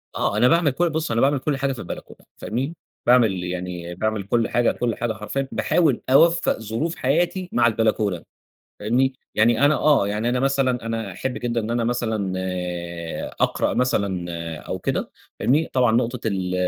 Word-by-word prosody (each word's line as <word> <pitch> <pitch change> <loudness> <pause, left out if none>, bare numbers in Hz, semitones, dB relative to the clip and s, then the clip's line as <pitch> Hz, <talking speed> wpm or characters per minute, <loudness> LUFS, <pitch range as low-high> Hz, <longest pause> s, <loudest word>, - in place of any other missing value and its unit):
آه، 100 - 0
أنا 120 +3 +5
باعمل 165 +1 +4
كـُ 135 - -5
بُص 160 -3 0
أنا 115 0 +1
باعمل 140 +1 +3
كل 140 +1 -1
حاجة 135 0 0
في 125 - -9
البلكونة، - - -8 0.2
فاهمني؟ 135 +9 -3 0.3
باعمل 115 -7 +4
يعني 90 -1 -5
باعمل 110 +2 -1
كل 115 +4 +1
حاجة، 120 0 +2
كل 120 -3 -2
حاجة 120 -1 -2
حرفيًا، 110 +6 -3
باحاول 155 -8 +2
أوفق 165 +3 +4
ظروف 115 +10 -3
حياتي 175 +6 0
مع 120 -1 +3
البلكونة، 110 -5 0 0.6
فاهمني؟ 125 +6 +2 0.2
يعني 115 +5 +4
أنا 145 +1 +5
آه، 150 -9 +3
يعني 105 +3 -1
أنا 125 +1 +1
مثلًا 130 -3 +1
أنا 115 -3 -3
أحب 130 +8 -3
جدًا 120 -1 -1
إن 110 +1 -4
أنا 120 0 0
مثلًا 110 -5 -1
آآ 90 -2 -4
أقرأ - - +1
مثلًا 100 -8 0 0.3
أو - - -5
كده، - - -2 0.3
فاهمني. 150 +6 +2
طبعًا 125 -3 +3
نُقطة 120 0 0
ال 95 -3 -1
120 Hz, 175 wpm, -23 LUFS, 105-135 Hz, 0.6 s, أنا